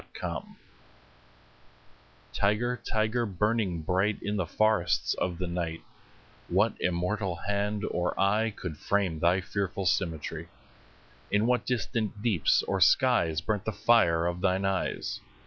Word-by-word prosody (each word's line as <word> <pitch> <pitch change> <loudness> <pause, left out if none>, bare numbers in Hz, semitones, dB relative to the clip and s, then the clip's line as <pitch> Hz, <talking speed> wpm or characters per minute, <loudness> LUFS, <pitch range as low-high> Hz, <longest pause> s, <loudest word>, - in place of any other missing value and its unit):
The - - -8
Tiger - - -5 1.8
TIGER, 120 +4 0
tiger, 110 +2 +1
burning 100 -3 0
bright 95 +6 +1
In 105 - -1
the 95 -5 -1
forests 110 -2 +2
of 90 -2 -2
the 90 - -3
night, 85 -2 -3 0.7
What 100 +5 +2
immortal 90 +2 -1
hand 100 +1 -1
or 90 0 -2
eye 105 +3 +3
Could 90 -7 -7
frame 95 -6 0
thy 85 +4 +3
fearful 95 +1 -3
symmetry? 80 -2 -1 0.8
In 105 +2 +2
what 125 +1 +1
distant 110 -2 -2
deeps 100 - +3
or 95 -1 -1
skies 90 - +4
5 - - -25
Burnt 105 -2 -1
the 110 - -1
fire 85 -10 +3
of 90 0 -2
thine 95 0 +1
eyes? 95 -1 -2
100 Hz, 135 wpm, -28 LUFS, 85-110 Hz, 1.8 s, skies